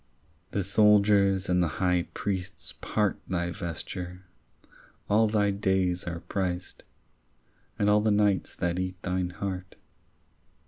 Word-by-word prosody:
The 100 - -1
soldiers 100 -1 +4
and 90 0 +2
the 85 - +2
high 90 -3 +1
priests 95 -3 -4
part 105 -2 0
Thy 85 -1 -1
vesture: 90 +2 -6 0.8
all 110 +2 +4
thy 105 -1 +2
days 95 -3 0
are 85 -1 -4
priced, 90 -2 -3 0.9
And 100 - +1
all 105 0 +5
the 110 - +2
nights 105 -2 +2
that 90 +1 -1
eat 95 0 -3
thine 90 -1 -1
heart. 95 0 -5
95 Hz, 125 wpm, -28 LUFS, 90-100 Hz, 0.9 s, all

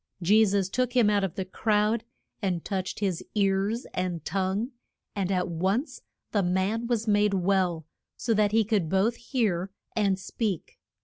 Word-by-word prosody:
Je 205 +5 +5
sus 200 -2 +2
took 250 +5 -1
him 235 -5 +4
out 205 -1 +2
of 190 -4 -2
the 190 - -3
crowd, 210 +3 +1 0.4
and 180 -5 -1
touched 190 0 -3
his 185 -4 -1
ears 200 +3 +1
and 180 -3 -2
tongue, 195 - -1 0.4
and 195 -2 -1
at 180 -2 +1
once 190 - -1 0.3
the 205 - +2
man 190 +6 0
was 230 -2 0
made 205 -1 +3
well, 180 -3 +1 0.3
so 235 - 0
that 210 -1 +3
he 225 +1 +4
could 200 -6 0
both 195 +6 +2
hear 210 -8 -1 0.3
and 200 -3 +2
speak. 195 -1 -4
200 Hz, 165 wpm, -27 LUFS, 185-220 Hz, 0.4 s, Je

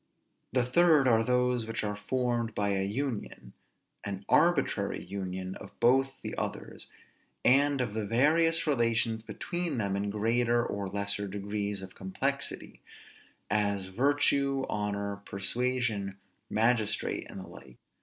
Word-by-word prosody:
The 125 -1 +2
third 155 +1 +5
are 115 -2 +4
those 125 -1 +1
which 115 0 -3
are 105 -1 -2
formed 120 +1 -1
by 100 0 +1
an 95 0 0
union, 130 0 -4 0.5
an 100 -1 -5
arbitrary 140 -12 +2
union 95 -1 -5
of - - -13
both 135 +2 +3
the - - -4
others, - - -5 0.6
and 140 +2 +4
of 115 -5 -2
the 110 -2 -2
various 165 +8 +3
relations 115 -5 +2
between 175 +7 -3
them 100 -3 0
in 100 +1 -1
greater 120 +3 +1
or 100 -1 -3
lesser 100 +1 -1
degrees 100 0 -3
of 95 - -9
complexity; 135 +9 -3 0.7
as 100 -2 +1
virtue, 140 +2 +2
honor, 100 -1 -2
persuasion, 100 0 -2 0.3
magistrate, 110 -1 +1
and - - -8
the 95 - -9
like. 65 -2 -13
115 Hz, 130 wpm, -30 LUFS, 100-130 Hz, 0.7 s, third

